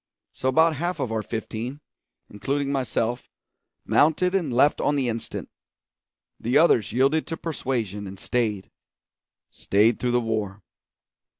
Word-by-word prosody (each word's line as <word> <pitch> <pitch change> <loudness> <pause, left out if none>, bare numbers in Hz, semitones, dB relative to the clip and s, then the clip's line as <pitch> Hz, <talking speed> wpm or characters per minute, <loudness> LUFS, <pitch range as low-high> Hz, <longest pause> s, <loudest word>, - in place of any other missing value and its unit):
So 130 - -1
about 160 +2 +3
half 175 +4 -2
of 115 - -2
our 110 -1 -1
fifteen, 115 +5 -5 0.5
including 140 +6 -2
myself, 125 -3 -1 0.6
mounted 160 +5 +3
and 175 -8 0
left 130 +5 +3
on 145 - +1
the 135 -3 0
instant; 115 -1 -4 0.9
the 120 +3 +2
others 120 -10 +4
yielded 135 +7 +2
to 165 - -4
persuasion 115 - -3
and 95 0 -9
stayed 110 -6 -1 0.8
stayed 110 +4 +2
through 125 - 0
the 120 0 +3
war. 110 -3 -3
125 Hz, 130 wpm, -25 LUFS, 110-145 Hz, 0.9 s, others